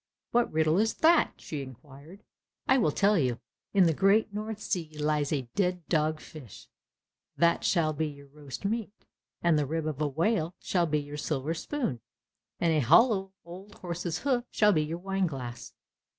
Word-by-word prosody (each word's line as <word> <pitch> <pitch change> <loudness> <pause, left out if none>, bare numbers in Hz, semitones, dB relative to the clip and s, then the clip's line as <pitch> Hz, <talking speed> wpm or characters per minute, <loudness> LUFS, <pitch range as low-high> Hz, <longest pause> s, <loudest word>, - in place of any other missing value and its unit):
"What 240 0 +2
riddle 155 +2 +2
is 220 +1 +1
that?" 330 0 +4
she 150 -3 -6
inquired. 140 - -12 0.4
"I 265 - +5
will 185 - +3
tell 200 +5 +3
you. 125 -4 0 0.3
In 195 -2 +5
the 165 -2 +3
great 200 +5 +3
North 215 +1 -4
Sea 165 -7 -4
lies 150 -1 0
a 140 -4 0
dead 180 -3 0
dog 155 -1 +1
fish, 140 -12 -12 0.7
that 170 0 +3
shall 160 -4 +2
be 155 +1 -1
your 140 -1 -10
roast 145 +4 -9
meat, 215 0 -3 0.4
and 170 -3 +4
the 145 - -1
rib 160 +2 -2
of 155 -2 -3
a 150 - +2
whale 170 - 0
shall 175 -2 0
be 150 0 +1
your 145 0 -7
silver 150 +1 -2
spoon, 165 - -3 0.6
and 170 -1 +2
a 155 - +3
hollow 190 - +4
old 190 +4 -11
horse's 175 -1 -4
hoof 255 -4 +1
shall 210 -1 +3
be 155 - +2
your 155 +2 -3
wine 195 +1 -1
glass." 125 -6 -7
165 Hz, 180 wpm, -29 LUFS, 150-195 Hz, 0.7 s, I